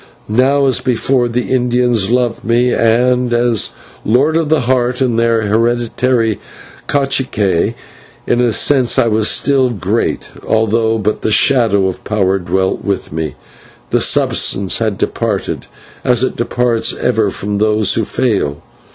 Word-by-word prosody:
Now 135 +6 +2
as 130 - +1
before 125 0 0
the 120 +1 -3
Indians 120 -4 +1
loved 120 -1 0
me, 120 +2 +1
and, 125 +2 +2
as 120 -2 +1 0.3
Lord 135 +8 +2
of 165 -2 0
the 160 -1 +2
heart 125 0 0
and 120 -4 +1
their 115 -1 +1
hereditary 115 +1 0 0.5
/cacique/, 120 -8 0 0.5
in 120 - +1
a 120 -1 +2
sense 130 +1 +2
I 110 -2 +2
still 130 +4 +2
was 115 -5 -6
great, - - -2
although 110 0 +1
but 105 0 -2
the 110 - -1
shadow 110 -4 +2
of 95 -1 -4
power 95 -2 0
dwelt 95 +1 -1
with 100 -2 -3
me: 80 0 -4 0.6
the - - +2
substance 95 -1 +1
had 110 -4 -1
departed, - - -3 0.4
as 125 -1 +2
it 130 - -1
departs 120 0 0
ever 110 -4 0
from 100 +1 -4
those 105 -1 +2
who 115 - 0
fail. 100 - -1
115 Hz, 140 wpm, -14 LUFS, 105-125 Hz, 0.6 s, Now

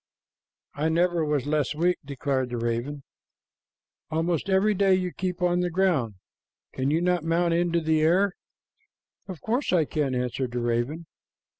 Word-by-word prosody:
"I 155 +2 0
never 170 0 +2
was 150 -3 0
less 150 0 0
weak," 175 +3 +1
declared 135 -2 -2
the 120 - -3
raven. 120 +5 -3 1.1
"Almost 165 +3 -1
every 195 +3 +3
day 195 -1 +3
you 180 -1 -1
keep 180 -1 -3
on 175 0 +2
the 180 0 0
ground. 160 - +1 0.6
Can 130 +1 -1
you 160 +3 +1
not 180 -2 +1
mount 170 +1 +1
into 170 0 +1
the 160 -1 +2
air?" 180 +5 +3 0.9
"Of 185 -5 -8
course 245 +6 -1
I 170 -4 +3
can," 140 -3 -1
answered 125 0 -2
the 125 - -1
raven. 120 +8 -1
160 Hz, 155 wpm, -26 LUFS, 140-180 Hz, 1.1 s, every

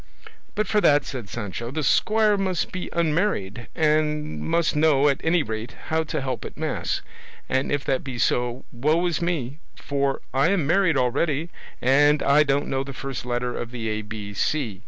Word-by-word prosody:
"But 215 0 +1
for 210 - +2
that," 145 -5 +4
said 120 -7 -6
Sancho, 115 +2 -5
"the 155 +4 -3
squire 215 +8 +3
must 190 -4 -1
be 185 - -5
unmarried, 155 - 0
and 150 -1 +1
must 165 -1 +1
know, 150 -2 +4
at 140 -2 +1
any 165 0 +3
rate, 110 0 -5
how 160 0 +2
to 155 -1 -3
help 130 -4 -3
at - - -9
mass, - - -2 0.4
and 130 +1 0
if 145 -1 -1
that 135 - 0
be 130 -3 -6
so, 120 +1 0
woe 155 +8 +1
is 175 -2 0
me, 150 -5 -2 0.2
for 140 -1 -1
I 135 +5 +3
am 190 -6 +1
married 170 -1 +3
already 145 +6 0 0.3
and 145 +3 +4
I 140 +2 +5
don't 145 -1 +2
know 135 0 -1
the 135 0 -8
first 130 -2 -5
letter 120 0 -1
of 120 - -4
the 115 -2 -4
A 110 0 -2
B 105 -1 -7
C. 110 -2 -1
140 Hz, 185 wpm, -24 LUFS, 125-160 Hz, 0.4 s, I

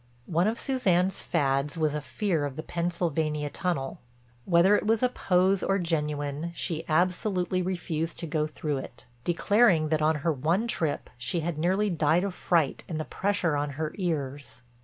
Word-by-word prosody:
One 170 +6 +1
of 225 +2 -1
Suzanne's 190 -9 +1
fads 140 -2 0
was 155 -2 +1
a 150 - -2
fear 170 0 -1
of 140 -2 -3
the 155 - -5
Pennsylvania 160 -4 -1
Tunnel. 165 -8 -2 0.5
Whether 180 +3 +5
it 210 - 0
was 225 +2 +2
a 250 - +4
pose 185 -4 +2
or 195 - +1
genuine 150 -2 -2
she 165 -3 -2
absolutely 180 +2 +1
refused 170 -3 -2
to - - -3
go 155 -1 0
through 150 -2 -3
it, 130 - -8 0.2
declaring 175 - +3
that 155 0 +1
on 155 +1 +3
her 165 - +3
one 165 - 0
trip 160 -10 -2
she 125 +8 -1
had 160 -1 -3
nearly 190 +5 +1
died 160 +1 +2
of 200 -2 -2
fright 165 -6 +1
and 160 -2 -3
the 155 - -3
pressure 195 -6 0
on 145 0 -1
her 155 -1 -2
ears. 145 - -3
165 Hz, 175 wpm, -28 LUFS, 150-185 Hz, 0.5 s, Whether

